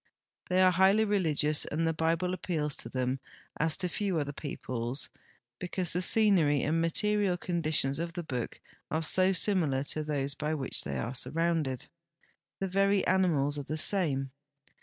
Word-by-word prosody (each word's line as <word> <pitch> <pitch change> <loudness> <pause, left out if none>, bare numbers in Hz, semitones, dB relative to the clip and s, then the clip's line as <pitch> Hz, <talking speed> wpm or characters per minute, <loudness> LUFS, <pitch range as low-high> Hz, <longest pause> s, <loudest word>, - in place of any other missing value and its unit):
They 185 +1 +4
are 185 - +6
highh' 195 +4 +4
religious, 155 -7 +2
and 165 +2 -2
the 165 - +1
Bible 165 +3 0
appeals 160 -5 -1
to - - -2
them 130 +1 -2 0.4
as 160 0 +2
to 180 - -1
few 190 0 -2
other 145 -2 -2
peoples, 130 -3 -4 0.5
because 180 -1 -1
the 180 - 0
scenery 180 - +3
and 160 +3 +1
material 200 +2 +1
conditions 155 -6 -1
of 170 0 -3
the 175 0 -5
Book 125 -6 -4 0.3
are 160 +2 -1
so 185 +4 +4
similar 165 -8 0
to 155 +2 -2
those 140 -2 -1
by 150 +2 -2
which 135 -3 -3
they 70 - -3
are 90 - -3
surrounded. 150 -1 -1 0.7
The 195 - -1
veiy 195 +1 +2
animals 150 -7 +2
are - - -4
the 155 +3 -4
same. 155 -7 +1
160 Hz, 160 wpm, -30 LUFS, 145-185 Hz, 0.7 s, are